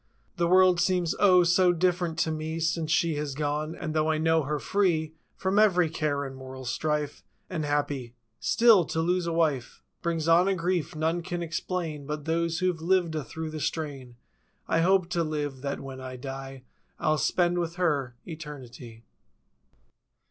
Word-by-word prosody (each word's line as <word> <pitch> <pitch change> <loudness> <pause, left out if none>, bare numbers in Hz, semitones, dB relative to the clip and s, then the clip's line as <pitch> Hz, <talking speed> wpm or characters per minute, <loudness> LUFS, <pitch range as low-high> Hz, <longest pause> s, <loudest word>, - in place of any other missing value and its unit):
The 170 0 +2
world 185 0 +5
seems 180 -2 +1
O, 185 -3 +6
so 175 +1 +4
different 175 -1 0
to 160 - +1
me 155 +1 -3
Since 165 -1 -1
she 165 -2 +2
has 145 -2 -3
gone. 150 +2 -2
And 155 -2 -4
though 155 0 +1
I 155 - +2
know 160 +1 +3
her 150 +1 -2
free 160 - 0 0.2
From 190 +2 +1
every 180 -6 +4
care 145 -3 -1
and 135 -1 -7
mortal 130 0 -9
strife. 150 +3 -2 0.3
And 155 -2 -2
happy—still, 145 - +2
to 160 - -3
lose 175 +1 +1
a - - 0
wife 155 -7 -1 0.2
Brings 165 -2 -1
on 170 +3 +5
a 195 - +2
grief, 175 -3 -1
none 160 +3 0
can 175 0 -4
explain 165 -3 -4
But 150 -1 -4
those 165 0 0
who've 180 -2 0
lived 175 -1 +2
a 155 -2 -2
through 160 +5 -6
the 155 - -5
strain. 140 -5 -4 0.5
I 165 - +2
hope 185 0 +3
to 170 -1 +1
live, 145 -4 -3
that 140 0 -3
when 135 -1 -8
I 130 0 -7
die 135 0 -7 0.4
Fll 155 -1 +1
spend, 175 -1 +1
with 170 -1 -3
her—eternity. 135 -6 -4
160 Hz, 170 wpm, -27 LUFS, 145-175 Hz, 0.5 s, O